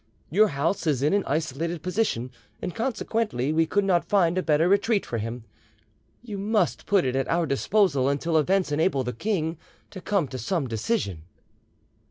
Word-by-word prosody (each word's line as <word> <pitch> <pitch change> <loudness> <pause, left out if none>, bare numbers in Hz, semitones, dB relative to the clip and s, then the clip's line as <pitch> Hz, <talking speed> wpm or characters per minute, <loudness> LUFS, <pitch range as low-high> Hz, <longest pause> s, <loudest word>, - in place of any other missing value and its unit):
Your 215 +6 +5
house 165 +3 -1
is 140 -4 +1
in 150 - +2
an 200 -1 +2
isolated 160 +2 -2
position, 180 - -1 0.3
and 180 - -4
consequently 225 - -1
we 165 0 +2
could 205 +4 +1
not 180 -3 +1
find 180 -4 +3
a 185 - +1
better 160 0 +2
retreat 200 +2 +2
for 115 - -3
him. 115 +2 -5 0.8
You 210 -5 -6
must 210 +2 0
put 200 -6 +3
it 130 0 -1
at 135 0 0
our 170 0 +2
disposal 140 -1 +2
until 160 +4 -1
events 185 +2 +1
enable 145 -2 +1
the 125 0 -3
king 165 - -2 0.3
to 190 - -8
come 195 -7 0
to 130 - -6
some 175 -3 -1
decision." 110 - -2
165 Hz, 175 wpm, -25 LUFS, 140-200 Hz, 0.8 s, Your